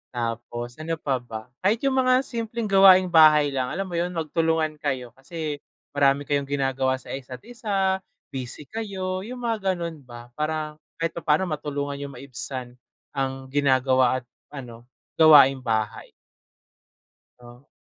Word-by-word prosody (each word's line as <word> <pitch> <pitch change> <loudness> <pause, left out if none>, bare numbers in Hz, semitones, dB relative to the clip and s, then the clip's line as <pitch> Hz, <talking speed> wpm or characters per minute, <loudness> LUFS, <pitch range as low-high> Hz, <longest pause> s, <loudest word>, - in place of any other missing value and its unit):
Tapos 120 +2 -4
ano 165 +1 -2
pa 140 -4 -1
ba? 120 0 -9
Kahit 210 +6 +1
yung 265 -1 +2
mga 255 +1 +4
simpleng 230 -3 -4
gawaing 185 -2 +7
bahay 150 -3 +6
lang, 130 -2 -1
alam 180 +8 -3
mo 175 -3 -3
yun 175 0 -2
magtulungan 160 -1 0
kayo, 130 -5 -3
kasi 150 +1 -5 0.3
marami 140 0 +3
kayong 140 0 -1
ginagawa 135 -1 0
sa 130 - -10
isa't-isa, 190 - -2 0.3
busy 130 +2 -5
kayo, 190 0 -4
yung 245 0 -7
mga 210 -5 0
ganun 170 -3 -5
ba 120 0 -11
parang 155 +1 -3 0.2
kahit 165 0 -2
papaano 165 0 +1
matulungan 145 -1 -3
n'yong 140 -2 -7
maibsan 125 -1 -6 0.3
ang 135 -1 -4
ginagawa 130 -2 +3
at - - -39 0.3
ano 120 -3 -10 0.3
gawaing 140 -4 +8
bahay. 110 -3 -2 1.3
Oh, 120 +3 -15
145 Hz, 140 wpm, -24 LUFS, 130-175 Hz, 1.3 s, gawaing